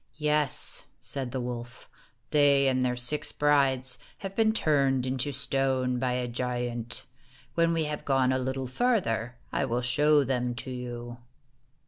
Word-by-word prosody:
"Yes," 150 -2 0
said 135 -3 -4
the 130 - -3
wolf, 120 -1 -6 0.2
" - - -41
they 140 -2 +5
and 130 -1 +2
their 125 -1 +1
six 125 +5 -2
brides 135 -3 +2 0.3
have 195 0 -5
been 220 0 +4
turned 135 - +2
into 130 +2 -1
stone 130 -2 0
by 125 0 0
a 125 0 -1
giant. 120 -1 -3 0.5
When 170 0 +3
we 165 -1 +1
have 150 -1 -3
gone 135 -2 +2
a 130 - +1
little 130 +1 -2
farther, 125 - 0 0.2
I - - 0
will 120 +2 -1
show 145 +4 +4
them 125 -2 -1
to 130 - -5
you." 120 -1 -6
130 Hz, 155 wpm, -28 LUFS, 125-145 Hz, 0.5 s, they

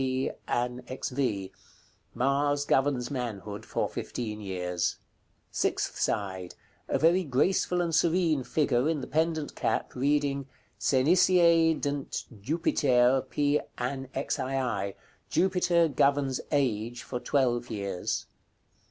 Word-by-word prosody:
P. 130 0 0 0.2
AN. 125 +1 -1
XV." 125 -7 -2 0.6
Mars 145 +2 +1
governs 135 -3 +1
manhood 110 -6 -5
for - - -1
fifteen 110 -3 -5
years. 90 -3 -2 0.5
Sixth - - -1
side. 95 -3 -2 0.3
A - - +1
very 175 +4 +4
graceful 175 +5 +1
and 170 -1 -1
serene 165 -3 +2
figure, 130 +1 +1
in 155 -3 -1
the - - -4
pendent 160 -1 -1
cap, - - -1
reading. 140 0 0 0.3
"SENICIE 165 +3 +4
DNT 145 -1 -3 0.2
JUPITER, 130 -2 +2
P. 145 0 +2 0.2
ANN. 130 +2 -3
XII." 130 -6 -1 0.3
Jupiter 175 -2 +3
governs 140 -2 +1
age 120 -4 0
for 125 - -4
twelve 120 -3 +1
years. 100 -5 -3
135 Hz, 110 wpm, -28 LUFS, 120-155 Hz, 0.6 s, very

